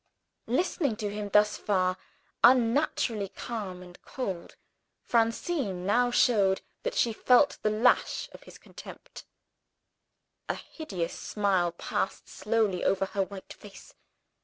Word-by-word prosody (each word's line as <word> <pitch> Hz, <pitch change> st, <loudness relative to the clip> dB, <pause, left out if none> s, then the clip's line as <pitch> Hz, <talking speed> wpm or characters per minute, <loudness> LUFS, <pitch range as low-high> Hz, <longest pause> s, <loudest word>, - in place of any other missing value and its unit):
Listening 275 Hz, -1 st, 0 dB
to 210 Hz, -1 st, -4 dB
him 210 Hz, -1 st, -4 dB
thus 210 Hz, +1 st, +3 dB
far, 185 Hz, -2 st, +1 dB, 0.5 s
unnaturally 235 Hz, -4 st, +3 dB
calm 200 Hz, -6 st, -6 dB
and 180 Hz, 0 st, -15 dB
cold, 190 Hz, -10 st, -5 dB, 0.5 s
Francine 230 Hz, -, 0 dB
now 245 Hz, +5 st, +3 dB
showed 205 Hz, -6 st, +3 dB, 0.2 s
that -, -, -3 dB
she 235 Hz, -, +2 dB
felt 250 Hz, +5 st, +3 dB
the 215 Hz, -, +1 dB
lash 220 Hz, +4 st, +2 dB
of -, -, -13 dB
his -, -, -14 dB
contempt. -, -, -12 dB, 1.2 s
A -, -, 0 dB
hideous 185 Hz, -, -5 dB
smile 190 Hz, -4 st, 0 dB
passed -, -, -3 dB
slowly 210 Hz, -4 st, 0 dB
over 195 Hz, 0 st, +2 dB
her 195 Hz, +1 st, -2 dB
white 195 Hz, 0 st, -6 dB
face. 205 Hz, -2 st, -14 dB
210 Hz, 120 wpm, -28 LUFS, 190-245 Hz, 1.2 s, thus